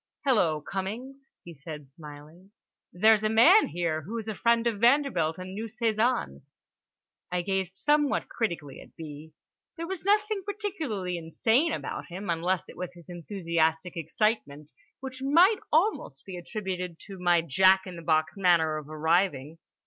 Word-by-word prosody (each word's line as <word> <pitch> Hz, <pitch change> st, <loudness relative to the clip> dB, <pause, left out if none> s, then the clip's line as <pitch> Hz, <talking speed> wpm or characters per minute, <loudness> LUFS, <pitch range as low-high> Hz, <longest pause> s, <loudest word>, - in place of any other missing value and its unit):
"Hello, 175 Hz, -, +2 dB
Cummings," 240 Hz, -, -6 dB, 0.2 s
he 170 Hz, -, -10 dB
said 150 Hz, -2 st, -10 dB
smiling. 150 Hz, +5 st, -13 dB, 0.4 s
"There's 215 Hz, +3 st, +4 dB
a 215 Hz, -, +2 dB
man 315 Hz, -, +6 dB
here 165 Hz, -2 st, -2 dB
who 215 Hz, +10 st, -6 dB
is 220 Hz, -1 st, -6 dB
a 220 Hz, -, -2 dB
friend 235 Hz, +2 st, +2 dB
of 225 Hz, -4 st, 0 dB
Vanderbilt 235 Hz, -, +3 dB
and 185 Hz, +1 st, -7 dB
knew 215 Hz, +3 st, -4 dB
Cézanne." 225 Hz, -, 0 dB, 0.9 s
I 180 Hz, -1 st, -1 dB
gazed 190 Hz, 0 st, -2 dB
somewhat 295 Hz, -1 st, +1 dB
critically 170 Hz, -, -4 dB
at -, -, -17 dB
B. 155 Hz, 0 st, -10 dB, 0.4 s
There 335 Hz, -, -4 dB
was 370 Hz, -1 st, -5 dB
nothing 420 Hz, +1 st, +2 dB
particularly 310 Hz, -, -3 dB
insane 225 Hz, -, +1 dB
about -, -, -5 dB
him, 185 Hz, +1 st, -5 dB
unless 175 Hz, +2 st, -1 dB
it -, -, -13 dB
was 180 Hz, 0 st, -6 dB
his 170 Hz, 0 st, -16 dB
enthusiastic 170 Hz, -1 st, -1 dB
excitement, 160 Hz, -4 st, -2 dB, 0.3 s
which 260 Hz, -1 st, -7 dB
might 340 Hz, +10 st, +5 dB
almost 315 Hz, -, +1 dB
be 190 Hz, -, -7 dB
attributed 180 Hz, -2 st, -5 dB
to 195 Hz, -2 st, -10 dB
my 175 Hz, -1 st, +3 dB
jack 190 Hz, +4 st, +4 dB
in 185 Hz, -2 st, -8 dB
the 170 Hz, -, -8 dB
box 155 Hz, -1 st, +1 dB
manner 170 Hz, -5 st, +3 dB
of 150 Hz, -1 st, -8 dB
arriving. 160 Hz, -1 st, 0 dB
185 Hz, 155 wpm, -28 LUFS, 165-235 Hz, 0.9 s, man